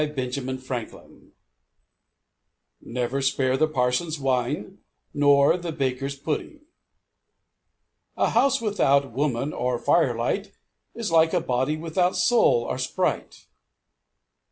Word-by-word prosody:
BENJAMIN 130 0 -3
FRANKLIN 130 -3 -6
MAXIMS - - -23 1.5
Never 125 +3 -3
spare 130 -1 +1
the 155 +4 +2
parson's 145 +3 -1
wine, 135 +8 -2 0.3
nor 145 0 +4
the 175 -2 -5
baker's 135 -1 -2
pudding. 155 - -4 1.6
A - - +1
house 250 +3 +3
without 140 - +1
woman 140 +2 -1
or 125 0 -1
firelight 130 - 0 0.4
is 230 -6 -3
like 160 0 +4
a - - +3
body 130 -1 -1
without 175 +3 0
soul 180 - +3
or 130 - -3
sprite. 130 - -2
140 Hz, 105 wpm, -24 LUFS, 125-165 Hz, 1.6 s, nor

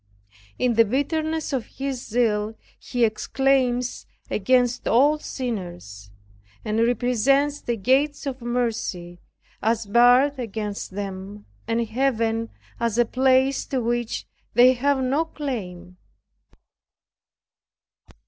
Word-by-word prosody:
In 250 -1 +1
the 230 0 +6
bitterness 310 +6 -1
of 255 -4 -2
his 270 -2 -4
zeal 220 -2 0 0.2
he 245 -2 +1
exclaims 250 +2 0 0.2
against 245 +3 +1
all 290 +6 +4
sinners, 175 - -6 0.6
and 215 +1 -1
represents 250 +5 +2
the 240 - -2
gates 270 +8 +1
of 265 -2 -4
mercy 230 -8 -3 0.4
as 225 0 0
barred 245 +6 +4
against 210 -3 -4
them, 200 +1 -7 0.2
and 230 +1 0
Heaven 230 -2 0 0.3
as 230 -1 -1
a 240 - +4
place 260 +2 +2
to 265 - -1
which 240 -1 -2 0.3
they 250 +2 +7
have 265 +1 +1
no 275 +5 +1
claim. 185 - -6
240 Hz, 105 wpm, -24 LUFS, 220-265 Hz, 0.6 s, they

